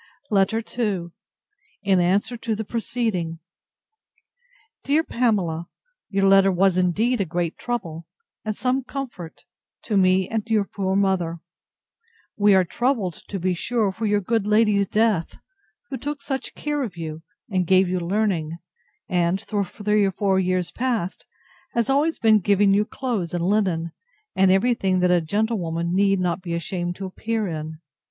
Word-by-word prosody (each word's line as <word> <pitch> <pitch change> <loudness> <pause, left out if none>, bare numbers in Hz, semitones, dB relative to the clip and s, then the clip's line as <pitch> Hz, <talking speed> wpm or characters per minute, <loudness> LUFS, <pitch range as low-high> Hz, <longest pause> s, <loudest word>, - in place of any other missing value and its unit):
LETTER 210 +3 +2 0.2
II 195 -7 -1 0.7
[In 195 -2 +3
answer 195 +7 +1
to 230 -1 -2
the 220 +1 -4
preceding.] 215 -8 -2 1.5
DEAR 300 +3 +2
PAMELA, 190 - 0 0.4
Your 195 -1 +1
letter 195 0 +6
was 190 0 +3
indeed 205 +7 +1
a - - +1
great 170 0 -2
trouble, 170 -9 -4 0.4
and 215 -1 -2
some 255 +3 0
comfort, 245 - -7 0.4
to 210 - 0
me 185 0 +3
and 225 0 -3
your 215 -2 +3
poor 190 -1 -2
mother. 190 -4 +1 1.0
We 205 -1 +5
are 190 - +5
troubled, 230 -2 0
to 195 - -4
be 185 +1 0
sure, 215 +3 0
for 215 +3 -3
your 205 0 +2
good 220 +1 0
lady's 210 -2 +3
death, 210 -6 +1 0.5
who 265 - -2
took 285 +2 -5
such 270 -2 -4
care 295 -1 -2
of 215 -10 -4
you, 160 -1 -6 0.3
and 185 -3 0
gave 190 +1 +5
you 180 0 -1
learning, 175 -3 -1 0.5
and, 175 +1 +1
for 205 0 -2
three 210 +2 0
or 195 - +1
four 190 0 +1
years 185 -1 0
past, 230 -8 -2 0.5
has 235 +2 +1
always 300 +4 +2
been 220 -1 +5
giving 200 0 +3
you 205 +1 +3
clothes 215 -10 -3
and 170 - -1
linen, 185 -5 +1 0.4
and 190 0 +4
every 195 +6 +4
thing 190 -5 0
that 180 0 +3
a 175 -1 +4
gentlewoman 170 -3 -1
need 195 0 +3
not 180 0 -1
be 170 -2 -3
ashamed 175 +1 -3
to 195 - -6
appear 220 +3 -2
in. 155 -1 -6
195 Hz, 160 wpm, -23 LUFS, 180-220 Hz, 1.5 s, letter